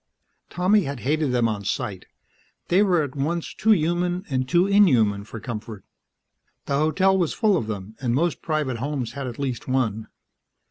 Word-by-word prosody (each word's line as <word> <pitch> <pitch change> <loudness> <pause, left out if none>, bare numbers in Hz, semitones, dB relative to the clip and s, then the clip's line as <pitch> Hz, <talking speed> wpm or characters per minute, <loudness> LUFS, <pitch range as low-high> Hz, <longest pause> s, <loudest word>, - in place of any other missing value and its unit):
Tommy 185 +2 +2
had 140 -2 -5
hated 150 +1 0
them 120 -2 +2
on 105 -2 -3
sight; - - -3 0.6
they 180 +3 +4
were 180 -6 +3
at 140 -1 -6
once 160 +5 -2
too 220 - -1
human 175 0 +2
and 130 0 -1
too 175 +1 +4
inhuman 125 - +4
for 110 +2 -9
comfort. 110 -2 -7 0.8
The 140 - -1
hotel 170 +6 +3
was 175 -5 +1
full 215 -4 +3
of 115 -11 -1
them, 105 0 -6
and 120 -2 0
most 170 +4 0
private 150 -6 -1
homes 130 -1 -3
had 140 -2 -5
at 120 - -7
least 130 -4 -4
one. 115 -5 -1
140 Hz, 175 wpm, -24 LUFS, 120-175 Hz, 0.8 s, they